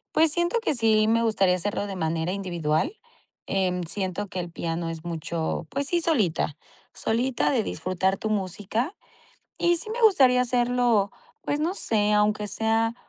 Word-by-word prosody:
Pues 320 -1 +5
siento 345 +6 +1
que 435 - 0
sí 220 -2 +3
me 230 +1 +3
gustaría 195 -5 +2
hacerlo 205 +2 -2
de 195 - -5
manera 165 0 -1
individual. 180 - -1 0.5
Em, 185 -2 0
siento 190 +3 -3
que 185 - -4
el 175 -1 -5
piano 165 0 -3
es 165 0 -6
mucho 165 0 -3
pues 280 0 -1
sí, 345 +2 +1
solita 195 - 0 0.4
solita 240 +3 0
de 245 -6 +2
disfrutar 185 0 -1
tu 220 - -3
música 210 - -2 0.6
y 345 0 +3
sí 380 - -4
me 470 +2 -3
gustaría 265 - +5
hacerlo. 245 -4 +2 0.3
Pues 290 - -2
no 330 +5 0
sé, 210 - +1
aunque 210 0 +2
sea 225 +2 +1
210 Hz, 160 wpm, -25 LUFS, 180-250 Hz, 0.6 s, Pues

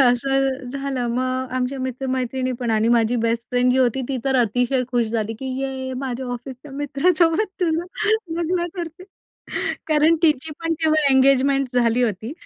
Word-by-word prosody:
असं 270 +2 +3 0.2
झालं. 275 -1 -3
मग 255 +1 -1
आमच्या 255 +2 -1
मित्र-मैत्रिणीपण 255 -1 -2
आणि 220 0 +2
माझी 235 0 +3
बेस्ट 230 0 0
फ्रेंड 250 0 +3
जी 260 - +2
होती 260 0 +2
ती 270 - -1
तर 265 -1 +2
अतिशय 245 +2 +1
खुश 240 -2 +2
झाली 225 -1 -1
की 265 - -6
"ये 265 -1 -3
माझ्या 260 -1 -4
ऑफिसच्या 260 +3 -8
मित्रासोबत 330 +7 +1
तुझं 335 -1 +1 0.5
लग्न 345 +1 0
ठरतय." 340 0 -6 0.8
कारण 310 +1 +4
तिची 310 -1 +2
पण 330 0 -1
तेव्हा 310 -1 +3
एंगेजमेंट 270 0 +4
झाली 240 0 +3
होती. 220 +1 -2
260 Hz, 150 wpm, -22 LUFS, 245-280 Hz, 0.8 s, कारण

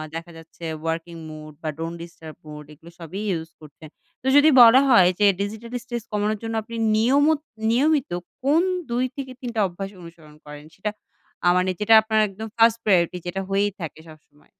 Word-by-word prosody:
দেখা 170 +1 -7
যাচ্ছে, 165 +1 -12 0.2
working 165 +1 -4
mood 155 -1 -10
বা 155 - -2
ডন্ট 165 +1 -5
ডিস্টার্ব 160 -2 -12
মুড 150 -1 -10
এগুলো 165 +3 -16
সবই 175 +5 -7
ইউস 165 -1 -4
করছেন। 155 +1 -14 0.3
তো 260 - -5
যদি 290 +2 +7
বলা 240 +3 +8
হয় 185 -8 +6
যে, 205 - +4 0.2
ডিজিটাল 220 +3 -5
স্ট্রেস 240 -3 -5
কমানোর 210 0 -1
জন্য 225 0 -4
আপনি 230 +2 -9 0.2
নিয়মত 285 +7 +3 0.3
নিয়মিত, 280 - +2 0.3
কোন 300 +5 +3 0.3
২ 245 +2 +1
থেকে 265 -2 -6
৩ 245 - -4
টা - - 0
অভ্যাস 195 +2 -7
অনুসরণ 165 -3 -14
করেন? 150 0 -11
সেটা 200 +3 -3 0.6
আ - - +4
মানে 185 +1 +1
যেটা 215 +2 +3
আপনার 220 0 0
একদম 210 +3 -8
1st 230 0 +5
প্রায়োরিটি 180 -3 +2
যেটা 195 +2 -3
হয়েই 200 +1 +1
থাকে 160 -1 -7
সবসময়। 150 -1 -19
195 Hz, 180 wpm, -23 LUFS, 165-230 Hz, 0.6 s, বলা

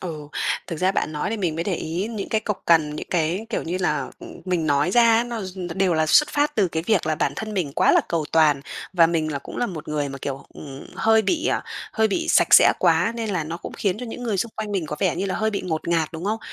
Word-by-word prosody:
Ừ. 155 -5 -6 0.4
Thực 165 - -5
ra 185 +3 +2
bạn 155 - -1
nói 150 +5 -2
thì 225 - -1
mình 180 -7 -1
mới 165 +1 -3
để 190 -2 0
ý 170 +6 -3
những 215 -4 -5
cái 220 - +1
cộc 210 -2 -4
cằn, 155 -3 +3
những - - -6
cái, 175 +5 0
kiểu - - -1
như 175 +3 -3
là, 150 -7 -1
ừm, - - -11
mình 180 -4 -1
nói 145 +3 +2
ra, 230 +1 +5
nó 235 -2 -5
d 185 0 -8
nó 175 -2 -5
đều 190 -2 +2
là 155 0 +2
xuất 300 - +5
phát 295 +1 0
từ 200 -4 +2
cái 160 -1 -3
việc 210 -8 +2
là 155 - +1
bản - - 0
thân 215 -1 -5
mình 170 -8 -1
quá - - +3
là - - +5
cầu 165 -3 0
toàn 155 -3 +4 0.3
và 170 -3 +5
mình 160 -2 -1
là 140 - -2
cũng - - -10
là 245 - 0
một 165 -7 -7
người 150 -2 -1
mà, 135 0 -7
kiểu, 135 0 -5
ừm, 140 -2 -9
hơi 220 0 +4
bị, 320 +5 0
ờ, - - +1 0.3
hơi 220 -1 +2
bị 330 +11 -2
sạch - - +5
sẽ - - +8
quá, 230 - +3
nên 225 -2 -3
là 180 -5 -1
nó 160 +2 -5
cũng - - -8
khiến 200 0 -1
cho 250 - -6
những 235 +2 -7
người 225 -4 -1
xung 225 +4 -2
quanh 215 -1 -4
mình 185 -5 -1
có 150 - -5
vẻ - - +1
như 190 +3 -1
là 185 - -2
hơi 220 0 0
bị 200 - -2
ngột 160 -2 -3
ngạt, 165 -2 +1
đúng 165 +3 -6
không? 215 +2 -1
180 Hz, 290 wpm, -23 LUFS, 155-215 Hz, 0.4 s, sẽ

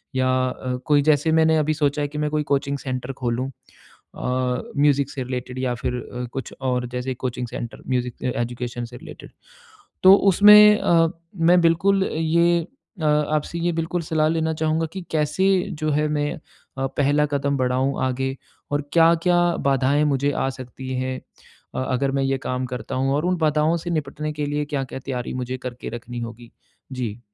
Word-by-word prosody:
या 130 0 +2 0.2
अ, 125 0 -4
कोई 145 -2 +4
जैसे 155 +1 +3
मैंने 160 0 +4
अभी 155 0 +1
सोचा 145 -1 0
है - - 0
कि 150 +1 -8
मैं 150 0 0
कोई 150 -1 0
कोचिंग 140 +1 0
सेंटर 130 0 -4
खोलूँ 125 +2 -1
अ, 125 0 -5 0.2
म्यूज़िक 140 -1 +3
से 130 -3 -4
रिलेटेड 125 0 -5
या 125 -2 -1
फिर 125 +1 -3
अ, 125 0 -6
कुछ 135 - -5
और 125 -1 -1
जैसे 125 +1 -2
कोचिंग 125 -1 -4
सेंटर, 120 0 -7
म्यूज़िक 125 -1 -2
अ, - - +2
एजुकेशन 120 0 -4
से 120 +1 -10
रिलेटेड। - - -12 0.7
तो 190 +1 +10 0.2
उसमें 210 +2 +8
अ, 165 -1 +4 0.3
मैं 175 +1 +4
बिल्कुल 190 +4 +3
ये 170 +2 +2 0.4
अ, - - -1
आपसे 150 +2 +1
ये 175 +1 +1
बिल्कुल 165 +2 -2
सलाह 155 -1 +3
लेना 160 -1 0
चाहूँगा 160 +1 0
कि 190 - -5
कैसे 155 +5 +1 0.3
जो 155 - 0
है, 150 +1 +1
मैं 145 -1 -1 0.4
अ, 135 - -1
पहला 145 +1 +3
कदम 140 0 0
बढ़ाऊँ 130 +2 0
आगे 135 +1 -2 0.4
और 145 +1 +1
क्या-क्या 170 +1 +4 0.3
बाधाएँ 135 +2 +2
मुझे 140 +2 +1
आ 135 - -1
सकती 130 +1 -8
हैं 130 0 -3 0.6
अ, 130 - -1
अगर 135 +1 0
मैं 135 0 0
ये 135 0 +1
काम 125 0 -1
करता 125 +1 -5
हूँ 135 +1 +1
और 150 +4 0
उन 180 0 +1
बाधाओं 155 +1 +2
से 175 +2 -6
निपटने 150 -1 -3
के 150 -1 -3
लिए 150 0 -1
क्या-क्या 135 -3 -4
तैयारी 125 -3 -4
मुझे 130 0 -3
करके 125 -1 -7
रखनी 120 +1 -7
होगी? 115 0 -8 0.4
जी? 120 -4 -4
140 Hz, 180 wpm, -23 LUFS, 125-155 Hz, 0.7 s, तो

